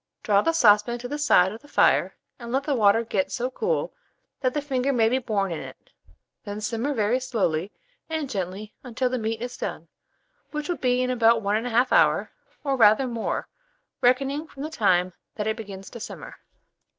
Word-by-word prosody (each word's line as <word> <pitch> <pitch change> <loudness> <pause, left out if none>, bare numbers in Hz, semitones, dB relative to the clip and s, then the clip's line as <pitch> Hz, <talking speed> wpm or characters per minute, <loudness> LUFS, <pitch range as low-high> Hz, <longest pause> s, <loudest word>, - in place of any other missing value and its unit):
Draw 205 -2 +3
the 330 - +2
saucepan 230 -5 +4
to 245 +1 -7
the 295 +3 -4
side 190 -11 +4
of 220 - -9
the 290 - -17
fire, - - +3 0.2
and 235 -1 -7
let 270 +2 +1
the 290 - -1
water 225 -2 +4
get 200 -4 -1
so 250 +2 -2
cool 480 - -1 0.5
that 255 0 -1
the - - +2
finger 270 -1 0
may 230 -4 +3
be 255 +3 +1
borne 205 -6 -1
in 165 - -3
it; - - -12 0.5
then 205 0 -6
simmer 230 +6 -2
very 225 +3 +1
slowly 195 -8 -1 0.4
and 315 -3 -2
gently 200 -1 -5
until 250 0 -2
the 255 - -1
meat 225 +1 -3
is 245 0 -6
done, - - -5 0.6
which 300 -1 -4
will 350 - -2
be 250 0 +1
in 255 - 0
about 230 -2 +3
1 210 +3 +1
1/2 245 +1 +2
hour, - - +3 0.3
or 275 -2 0
rather 220 +1 +5
more, 235 -3 -3 0.5
reckoning 275 +5 +2
from 280 -2 -9
the 310 - -5
time 185 - +2 0.2
that 210 - -3
it 220 0 0
begins 195 -4 -9
to 235 - -8
simmer. - - -8
235 Hz, 195 wpm, -25 LUFS, 210-265 Hz, 0.6 s, rather